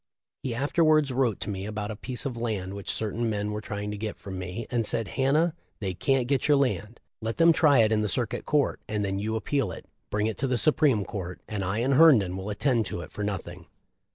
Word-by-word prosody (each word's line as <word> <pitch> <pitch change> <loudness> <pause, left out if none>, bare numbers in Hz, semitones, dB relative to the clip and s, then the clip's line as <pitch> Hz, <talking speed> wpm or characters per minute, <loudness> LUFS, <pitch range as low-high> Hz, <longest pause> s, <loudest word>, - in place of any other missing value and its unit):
He 125 -3 -3
afterwards 155 +1 +3
wrote 125 -5 +1
to - - -3
me 95 0 -4
about 105 0 -4
a - - -5
piece 125 +4 -5
of 130 -3 -2
land 105 -5 -3
which 100 -1 -7
certain 115 +2 -1
men 105 -1 -2
were 105 0 -3
trying 105 -1 -4
to 105 - -5
get 110 -1 -4
from 95 -2 -7
me, 90 +5 -5
and 120 -2 +1
said: 115 -1 -1
'Hannah, 150 +5 +2 0.3
they 95 -3 -2
can't 130 +7 +1
get 135 -1 +1
your 145 -1 +5
land. 120 -5 -1 0.2
Let 115 +1 -3
them 165 0 +6
try 145 -7 +5
it 110 - +2
in 110 -1 +2
the 105 - 0
Cir 120 +5 +1
cuit - - -6
Court, 150 -2 +1
and 105 -1 -1
then 95 0 -2
you 110 +2 -2
appeal 135 +5 -1
it; - - -9 0.2
bring 105 0 0
it 110 - -2
to 135 - 0
the 125 -1 +1
Supreme 145 -8 +3
Court 90 -4 -6
and 105 -3 -3
I 95 +3 -1
and 135 +3 +2
Herndon 130 - +6
will 95 +2 -5
attend 115 0 +1
to 85 - -4
it - - -10
for 105 - -5
nothing.' 90 -4 -5
110 Hz, 240 wpm, -27 LUFS, 100-135 Hz, 0.3 s, them